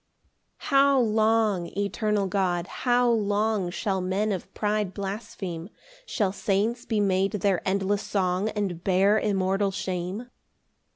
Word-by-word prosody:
PAUSE. - - -29
9 - - -6
How 275 0 +5
long, 220 -5 +2
eternal 205 0 0
God, 185 -2 0 0.2
how 245 0 +4
long 210 -3 +1
Shall 190 +1 -2
men 195 +4 0
of 190 -3 -4
pride 210 -2 -1
blaspheme? 195 -3 -5 0.4
Shall 205 -6 0
saints 205 +4 -1
be 220 -3 0
made 195 0 +1
their 200 -3 +1
endless 200 +1 +1
song, 190 0 0
And 195 -5 -3
bear 195 +3 +3
immortal 195 -1 +1
shame? 190 +5 -4
200 Hz, 130 wpm, -26 LUFS, 190-215 Hz, 0.4 s, How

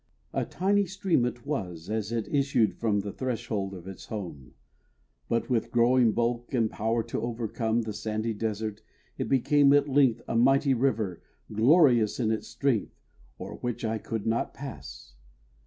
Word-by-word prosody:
A - - 0
tiny 200 +2 +1
stream 190 - +1
it 120 +1 -5
was 90 - -4
As 110 0 -2
it 115 -2 -2
issued 135 -6 +2
from 105 -3 0
the 100 0 -5
threshold 115 -6 -3
of 90 0 -10
its 95 - -9
home; 85 - -7 0.7
But 115 - 0
with 120 -4 0
growing 120 0 +4
bulk 120 +3 -1
and 115 -3 +1
power 115 +2 0
to - - -4
overcome 115 0 -1
The 110 -1 -4
sandy 110 +1 -2
desert, 110 0 -3 0.4
it - - -2
became 140 +2 +4
at 145 0 +4
length, 130 -4 +3
A - - -2
mighty 135 +4 +4
river, 115 -8 0 0.3
glorious 120 - +4
in 110 -3 +1
its 110 - -2
strength, 120 -1 -1 0.4
O'er - - -7
which 120 -1 -3
I 110 0 -1
could 110 -1 -4
not 115 +1 -1
pass. 65 - -9
115 Hz, 160 wpm, -28 LUFS, 110-130 Hz, 0.7 s, growing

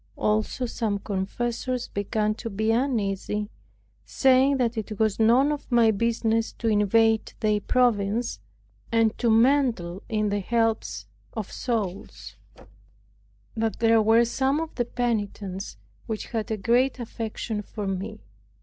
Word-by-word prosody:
Also 215 +4 0
some 220 -3 -2
confessors 235 +6 -3
began 210 +1 -1
to 230 +2 -6
be 220 +2 0
uneasy, 210 -4 -1 0.5
saying 265 +1 +3
that 240 -2 0
it 215 -1 -5
was 220 -1 +1
none 245 +6 +4
of 295 -2 -5
my 235 -2 +5
business 225 +1 0
to 230 - -4
invade 220 +1 +3
their 210 -1 +1
province, 235 -2 +1 0.5
and 225 -1 +3
to 235 - +2
meddle 225 -7 +2
in 215 -2 0
the 205 0 0
helps 225 +2 -1 0.3
of 215 -3 -5
souls; 210 -6 -4 1.2
that 225 -1 -1
there 225 -1 +4
were 225 +2 +5
some 265 +5 0
of 325 -1 -4
the 240 - -1
penitents 205 - -3 0.3
which 220 -2 -3
had 225 -2 -2
a 220 - -1
great 245 +7 +2
affection 225 -2 -4
for 210 0 -6
me. 195 - -4
225 Hz, 130 wpm, -25 LUFS, 210-240 Hz, 1.2 s, my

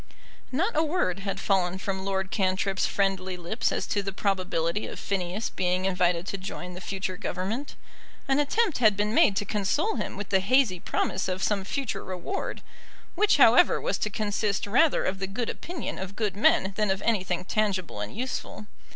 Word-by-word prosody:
Not 345 - 0
a 315 - +4
word 300 - 0
had 195 0 -3
fallen 185 -2 +1
from 190 0 -3
Lord 190 -1 -2
Cantrip's 190 -1 +1
friendly 190 -2 0
lips 180 +7 -1
as - - -1
to 205 - 0
the 195 0 -3
probability 185 -1 -1
of - - -7
Phineas 195 +2 -2
being 185 0 0
invited 180 -2 +1
to 195 - -4
join 180 -1 -6
the 180 - -8
future 190 0 -3
Government. 205 +13 -3 0.5
An 270 +1 +3
attempt 360 - +1
had 215 -5 +5
been 210 +1 0
made 200 - +5
to 205 - 0
console 215 - 0
him - - -4
with 205 0 -5
the 190 - +4
hazy 215 -2 +3
promise 185 - -1
of 185 0 -2
some 200 +1 +1
future 265 +4 -3
reward, 185 - -4 0.5
which 420 0 +3
however - - +6
was - - -1
to 210 - -1
consist 205 -1 -1
rather 255 +9 +3
of 190 0 -1
the 195 - -2
good 220 +4 -2
opinion 345 0 -6
of 190 +1 -6
good 210 -4 -1
men 195 -2 +3
than 210 -2 +1
of 190 0 0
anything 185 -5 0
tangible 195 - -1
and 105 - -6
useful. 250 -3 -4
195 Hz, 185 wpm, -27 LUFS, 185-220 Hz, 0.5 s, however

